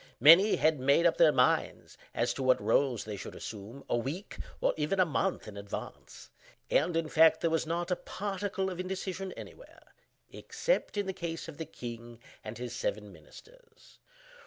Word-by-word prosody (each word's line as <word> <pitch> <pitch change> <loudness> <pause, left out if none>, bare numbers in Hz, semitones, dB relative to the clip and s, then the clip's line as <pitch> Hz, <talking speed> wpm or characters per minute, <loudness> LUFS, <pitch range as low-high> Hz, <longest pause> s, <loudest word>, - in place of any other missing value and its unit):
Many 170 - +8
had 155 -2 +2
made 140 +6 +3
up 170 - +3
their 160 -2 +6
minds 125 -3 +1 0.2
(as - - +1
to - - -6
what 130 -1 +3
roles 130 -6 +1
they 105 -1 -6
should - - -8
assume) 110 +6 -8
a - - 0
week, 140 - -4 0.2
or - - +2
even 155 +5 -1
a 185 - +6
month, 175 0 -1
in 105 - -9
advance; 100 0 -8 0.4
and, 165 +3 +2
in 165 -1 0
fact, 160 +1 +5
there 165 - +1
was 160 -1 0
not 170 +2 -2
a - - +3
particle 195 0 -3
of 180 - -7
indecision 190 0 -4
anywhere—except - - -5
in 205 - 0
the 190 - -3
case 170 -3 -5
of 160 -3 -9
the 160 - -5
king 120 -5 -9 0.2
and 110 +1 -7
his 120 0 -6
seven 105 -4 -3
minsters. 465 - -18
160 Hz, 175 wpm, -30 LUFS, 125-185 Hz, 0.4 s, Many